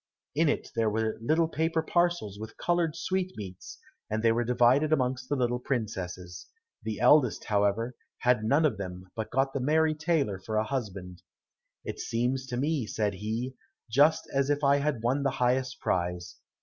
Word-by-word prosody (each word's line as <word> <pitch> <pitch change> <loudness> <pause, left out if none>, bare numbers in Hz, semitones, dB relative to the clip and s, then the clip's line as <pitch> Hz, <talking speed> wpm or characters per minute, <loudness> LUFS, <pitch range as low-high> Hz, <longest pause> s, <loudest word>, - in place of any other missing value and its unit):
In 160 +1 +3
it - - -2
there 115 -1 +2
were 110 +1 -1
little 160 +7 +2
paper 160 0 0
parcels 175 - 0
with 110 +1 -8
colored 175 -3 0
sweetmeats, 135 - -4 0.3
and 110 +1 -2
they 115 - +5
were 120 +1 +1
divided 125 +5 +3
amongst 130 -3 0
the 145 - +1
little 125 -2 0
princesses. 95 -8 -4 0.3
The 110 -2 -4
eldest, 140 -7 +4
however, 105 +4 +1 0.2
had 125 -3 +2
none 140 +8 +3
of 145 - 0
them, 90 -1 -7
but 110 -1 -4
got 135 +2 +1
the 140 - -1
merry 155 +4 +3
tailor 155 - 0
for 110 +3 -5
a 110 - +3
husband. 100 -8 -5 0.6
"It - - -5
seems 125 +3 -1
to 125 -1 -3
me," 140 -3 0
said 105 -1 -1
he, 110 +6 -3 0.4
"just 145 +6 +4
as 140 0 +1
if 145 0 0
I 140 0 +5
had 140 -5 -1
won 130 +4 +1
the 140 - +2
highest 130 +1 +1
prize. 90 0 -2
125 Hz, 175 wpm, -28 LUFS, 105-145 Hz, 0.6 s, they